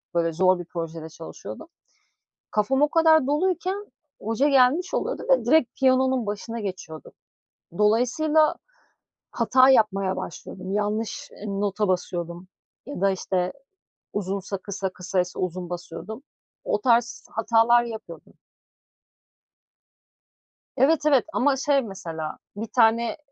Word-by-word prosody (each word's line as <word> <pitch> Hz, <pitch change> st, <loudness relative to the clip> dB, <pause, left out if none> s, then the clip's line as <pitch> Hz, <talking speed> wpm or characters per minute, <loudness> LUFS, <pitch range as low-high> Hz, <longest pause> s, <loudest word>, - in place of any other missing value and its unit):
böyle 165 Hz, -1 st, +1 dB
zor 185 Hz, +2 st, +3 dB
bir 175 Hz, -, -6 dB
projede 165 Hz, -2 st, -6 dB
çalışıyordum. 80 Hz, -, -10 dB, 0.8 s
Kafam 265 Hz, +7 st, +1 dB
o 295 Hz, -, +5 dB
kadar 320 Hz, -2 st, +4 dB
doluyken, 370 Hz, +6 st, -1 dB, 0.3 s
hoca 225 Hz, +7 st, +1 dB
gelmiş 275 Hz, +6 st, +3 dB
oluyordu -, -, -2 dB
ve 260 Hz, -3 st, +4 dB
direkt 270 Hz, +1 st, +2 dB
piyanonun 260 Hz, -2 st, +3 dB
başına 225 Hz, +3 st, -4 dB
geçiyordu. 185 Hz, -6 st, -7 dB, 0.7 s
Dolayısıyla 255 Hz, +9 st, +3 dB, 0.8 s
hata 255 Hz, +3 st, +4 dB
yapmaya 195 Hz, -6 st, +3 dB
başlıyordum. 185 Hz, +2 st, -7 dB
Yanlış, 210 Hz, +2 st, -2 dB, 0.2 s
ııı, 200 Hz, 0 st, -3 dB
nota 205 Hz, +1 st, 0 dB
basıyordum 175 Hz, -1 st, -3 dB, 0.4 s
ya 285 Hz, -9 st, -7 dB
da, 195 Hz, 0 st, +4 dB
işte, 185 Hz, -1 st, -2 dB, 0.6 s
uzunsa 195 Hz, 0 st, -3 dB
kısa 195 Hz, 0 st, -4 dB
kısaysa 180 Hz, 0 st, -2 dB
uzun 180 Hz, -1 st, -3 dB
basıyordum. 175 Hz, -, -7 dB, 0.4 s
O -, -, 0 dB
tarz 240 Hz, -1 st, +1 dB
hatalar 230 Hz, +2 st, +3 dB
yapıyordum. 225 Hz, -2 st, -9 dB, 2.5 s
Evet, 305 Hz, +2 st, +3 dB
evet, 280 Hz, -4 st, +4 dB
ama 285 Hz, -1 st, +2 dB
şey 275 Hz, +1 st, +2 dB
mesela 165 Hz, -8 st, -6 dB, 0.2 s
1 220 Hz, +2 st, -5 dB
tane 230 Hz, -1 st, +3 dB
220 Hz, 115 wpm, -24 LUFS, 185-265 Hz, 2.5 s, o